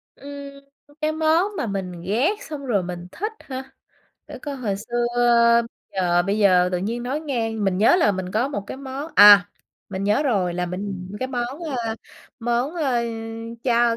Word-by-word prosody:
Ừm, 280 0 -9 0.5
cái 305 0 +1
món 320 +5 +2
mà - - -1
mình 185 -4 -4
ghét 220 - +1 0.2
xong 290 -3 -6
rồi 210 -7 +1
mình 175 0 -6
thích 425 +4 -3
hả? 265 0 -8 0.6
Để - - -9
coi 285 -2 -5
hồi 215 -7 -2
xưa 240 +4 -2 0.9
giờ 175 -2 +2
bây 200 +4 -1
giờ 180 -3 +5
tự 180 - +1
nhiên 225 +6 -3
nói 265 +5 -2
ngang, 225 -8 -2
mình 190 -2 +1
nhớ 220 - +5
là 270 - +3
mình 185 -1 -5
có 235 +5 +1
một 205 -9 -4
cái - - -6
món 275 +3 -6
à, 205 -1 +9 0.4
mình 195 0 -4
nhớ 210 +7 +2
rồi 195 - 0
là 180 0 -1
mình 185 0 -5
cái 260 - -1
món, 250 +2 -3
ơ, 245 -9 -3 0.5
món, 240 +6 0
ơ, 270 -8 +1 0.6
chao 235 -2 +3
230 Hz, 180 wpm, -23 LUFS, 195-275 Hz, 0.9 s, à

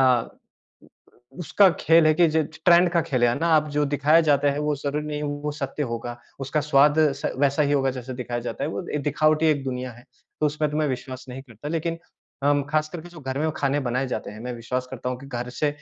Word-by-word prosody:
अ, 125 -3 -2 0.5
उसका 190 +3 +4
खेल 165 0 +5
है 155 - +6
कि 170 +2 +5
जि 160 +1 +2
ज 160 +2 -10
ट्रेंड 175 0 +6
का 170 - +3
खेल 130 -6 -1
है, - - +5
है 120 - -2
ना? 165 +1 +2
अब 155 0 +1
जो 150 0 +1
दिखाया 150 +3 +5
जाता 145 0 +3
है, 145 - -4
वो 150 0 0
ज़रूरी 145 +2 -3
नहीं 150 -1 -3
है, 150 - -3 0.2
वो 150 - 0
सत्य 145 0 -4
होगा। 120 +1 -5 0.2
उसका 135 +3 -1
स्वाद 145 +1 +4 0.2
स - - -2
वैसा 140 +2 +2
ही 145 0 +1
होगा, 135 -2 +2
जैसे 125 +1 -7
दिखाया 120 -1 -4
जाता 115 - -3
है। - - -2
वो 100 - -5
ए 150 - +1
दिखावटी 155 +2 +2
एक 145 -3 +2
दुनिया 125 -1 -4
है। 120 +2 -16 0.4
तो 150 - +3
उसमें 150 0 -1
तो 150 - -3
मैं 155 -1 +1
विश्वास 130 0 -5
नहीं 130 +1 -7
करता, 120 +2 -10
लेकिन 165 +1 -2 0.5
अम, 145 0 +3
खासकर 155 +2 -1
के 175 - -12
जो 175 -2 -12
घर 130 -1 -4
में 155 +2 +1
खाने 140 +1 0
बनाए 130 +1 -1
जाते - - -4
हैं, 105 - -10
मैं 125 0 -4
विश्वास 125 +2 -3
करता 125 -1 -5
हूँ 125 - -4
कि 135 - -12
घर 125 -2 -5
से 150 - +3
145 Hz, 250 wpm, -24 LUFS, 130-155 Hz, 0.5 s, है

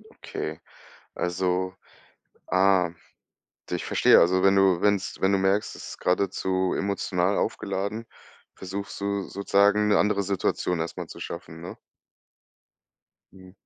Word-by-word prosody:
Okay, - - -6 0.6
also 90 +1 -1 0.8
ah, 95 -2 +3 0.8
ich - - -2
verstehe. - - +5
Also, 95 +2 +3
wenn 95 0 +5
du 95 -3 +4
wenn‘s 100 -2 0
wenn 95 +1 +3
du 100 - +3
merkst, 95 +2 +1
es - - -9
ist - - -9
geradezu 95 0 0
emotional 100 -1 0
aufgeladen, 100 +4 -2 0.5
versuchst 100 +2 -6
du 100 0 -1
sozusagen 100 +2 +2
‘ne 105 - +4
andere 105 -1 +2
Situation 90 -2 -1
erst 80 +1 -4
mal - - -6
zu - - -11
schaffen, 85 -1 -7
ne? 85 - -8 1.6
Ja, 95 -1 -15
95 Hz, 125 wpm, -26 LUFS, 90-100 Hz, 1.6 s, verstehe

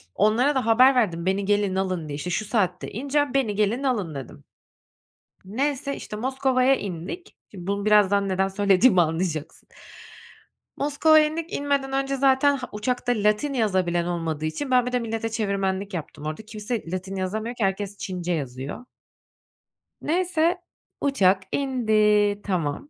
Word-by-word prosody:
Onlara 235 +8 +3
da 260 - 0
haber 250 +4 +6
verdim, 175 -9 +1
"Beni 195 +1 0
gelin, 205 -1 +1
alın." 185 -4 -2
diye, 145 - -4
işte, 150 +5 -5
"Şu 215 +4 -1
saatte 195 -5 -1
ineceğim, 285 +3 -1
beni 250 -7 +1
gelin, 215 +6 0
alın." 205 - -1
dedim. 130 - -9 1.0
Neyse, 275 +6 -2
işte, - - -7
Moskova'ya 260 +2 +2
indik. 195 - -7
Şimdi 180 -3 -9
bunu, 200 0 -2
birazdan 200 -2 +4
neden 190 +1 +1
söylediğimi 195 +1 +4
anlayacaksın. 160 -1 -3 1.1
Moskova'ya 305 +2 +4
indik, 325 +2 -5
inmeden 280 -1 -1
önce 275 0 0
zaten 275 +1 +3
Ha, 250 -1 -7
uçakta 245 +3 -1
Latin 210 +7 +1
yazabilen 185 -7 +1
olmadığı 165 -3 -3
için 260 - -3
ben 250 -1 +4
bir 250 - -3
de 250 - +1
millete 225 -1 -3
çevirmenlik 200 -2 -2
yaptım 155 -3 -6
orada, 155 +6 -4
kimse 215 -3 -5
Latin 185 +1 -4
yazamıyor 215 +5 -3
ki 235 - -2
herkes 200 +1 -2
Çince 180 -3 -4
yazıyor. 135 - -5 1.2
Neyse, 350 +1 +1 0.4
uçak 195 -9 +3
indi, 215 -6 +2
tamam. 175 - -2
210 Hz, 145 wpm, -24 LUFS, 185-260 Hz, 1.2 s, haber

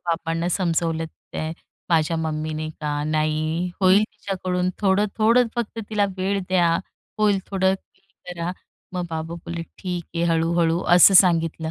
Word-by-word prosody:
बाबांना 165 0 -1
समजवलं 165 -3 0 0.3
ते 155 - -3 0.4
माझ्या 165 0 +2
मम्मीने 155 0 -3
की, - - -18 0.3
"नाही 155 +3 0
होईल 190 +2 +5
तिच्याकडून 185 -4 -3
थोडं-थोडं 215 +4 +3
फक्त 235 -2 -3
तिला 210 -2 +2
वेळ 195 +2 0
द्या. 175 -3 +3 0.4
होईल 210 -2 +3
थोडं, 190 -1 +1 0.2
धीर 195 - -34 0.3
धरा." 170 +1 -3 0.4
मग 180 -1 -3
बाबा 160 +1 -4
बोलेले, 170 0 -6 0.2
"ठीक 180 -2 -4
आहे," 170 - -1
हळू-हळू 165 +1 +1
असं 180 +2 +8
सांगितलं. 165 -3 +4
175 Hz, 135 wpm, -23 LUFS, 165-190 Hz, 0.4 s, असं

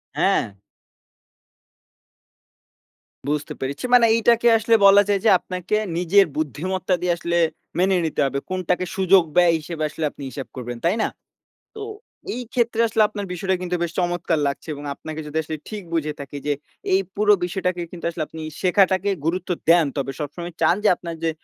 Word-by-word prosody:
হ্যাঁ। 100 -1 +1 2.7
বুঝতে 145 0 -2
পেরেছি। 140 - -4
মানে 240 -2 +7
এইটাকে 235 +1 +3
আসলে 225 +1 +3
বলা 200 +1 +8
যায় 200 -1 +2
যে - - +6
আপনাকে 185 +3 -3 0.2
নিজের 195 +3 +4
বুদ্ধিমত্তা 185 +5 -2
দিয়ে 180 -1 +2
আসলে 170 0 -1 0.4
মেনে 190 +1 +3
নিতে 155 - -1
হবে। 140 0 -1
কোনটাকে 185 0 -1
সুযোগ 190 -1 +5
ব্যয় 175 -1 +5
হিসেবে 155 0 -5
আসলে 155 +1 -6
আপনি 140 - -11
হিসাব 135 0 -7
করবেন, 120 -1 -6
তাই 180 +5 +3
না? - - +1 0.7
তো 435 - -7 0.5
এইক্ষেত্রে 235 -2 -1
আসলে 220 0 +1
আপনার 205 -1 -5
বিষয়টা 190 +2 -1
কিন্তু 180 0 -2
বেশ 170 - -2
চমৎকার 175 -2 0
লাগছে 140 - -4
এবং 145 0 -8
আপনাকে 155 0 -7
যদি 150 +2 -4
আসলে 155 +1 -5
ঠিক 210 -3 -6
বুঝে 155 -2 -1
থাকি 140 0 -7
যে, 145 - +2 0.4
এই 190 - +4
পুরো 210 0 +4
বিষয়টাকে 180 0 -2
কিন্তু 170 -2 -8
আসলে 165 -2 -3
আপনি 160 - -9 0.2
শেখাটাকে 190 +1 +3 0.2
গুরুত্ব 180 +2 -1 0.2
দেন। 170 -2 +6
তবে 135 0 -2
সবসময় 170 +4 -6
চান 160 +2 +4
যে - - +5
আপনার 170 -1 -7
যে 165 - +2
175 Hz, 165 wpm, -22 LUFS, 155-195 Hz, 2.7 s, বলা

